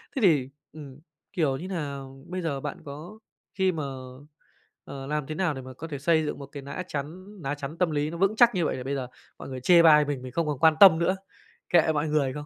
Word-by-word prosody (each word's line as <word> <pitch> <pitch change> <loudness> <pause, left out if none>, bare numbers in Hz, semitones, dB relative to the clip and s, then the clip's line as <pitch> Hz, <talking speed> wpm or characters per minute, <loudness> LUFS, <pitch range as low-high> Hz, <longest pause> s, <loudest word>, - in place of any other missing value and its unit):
Thế 265 - -1
thì, 145 -9 +3 0.2
ừm, 145 -3 -11 0.3
kiểu 150 -8 +1
như 180 - -7
nà, 150 -7 -4 0.3
bây 185 +1 -4
giờ 150 -5 -2
bạn 145 +1 -5
có 155 +9 -9 0.3
khi 190 -2 +2
mà 160 -3 -4 1.0
ờ, 135 -1 -8
làm 150 -1 -2
thế 155 - -5
nào 175 -4 0
để 135 - -7
mà 130 0 -10
có 160 +6 -8
thể 145 - -5
xây 160 +1 +2
dựng 150 - -4
một 140 - -7
cái 140 0 -10
nã 140 +7 -5
chắn 155 +6 -6 0.2
ná 140 0 -2
chắn 145 +2 -7
tâm 175 -2 +1
lý 150 0 -1
nó 170 - -6
vững 195 +4 +2
chắc 240 -1 +5
như 175 -3 +1
vậy, - - -1
để 125 - -6
bây 140 +2 -2
giờ 130 -2 -4 0.3
mọi - - -8
người 130 - -5
chê 170 +5 +6
bai 150 -2 +7
mình 140 -3 -3
mình 130 0 -8
không 165 +4 -1
còn 145 -3 -2
quan 160 +1 +5
tâm 180 -5 +9
nữa, 185 +3 +1 0.5
kệ 165 -2 +4
mọi 150 +1 0
người 145 -4 +1
không? 145 0 -7
150 Hz, 255 wpm, -26 LUFS, 140-170 Hz, 1.0 s, tâm